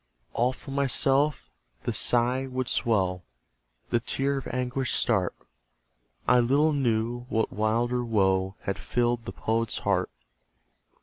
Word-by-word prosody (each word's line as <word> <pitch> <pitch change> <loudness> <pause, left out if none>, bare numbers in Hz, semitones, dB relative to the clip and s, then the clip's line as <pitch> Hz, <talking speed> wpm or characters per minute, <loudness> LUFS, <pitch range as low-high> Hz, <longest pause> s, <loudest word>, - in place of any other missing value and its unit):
All 125 +2 +2
for 135 - -10
myself 140 +1 +2 0.4
the - - -1
sigh 125 +2 +2
would 130 -1 -3
swell, 95 -6 +1 0.7
The 120 - +3
tear 135 +4 0
of 130 - -9
anguish 125 0 -2
start; 95 -7 +1 0.9
I 125 0 +5
little 140 +6 +3
knew 120 -2 -1
what 110 0 0
wilder 120 +3 0
woe 95 -4 +1
Had 100 - -3
filled 120 -1 0
the - - -5
Poet's 115 0 -1
heart. - - +1
120 Hz, 125 wpm, -27 LUFS, 110-130 Hz, 0.9 s, I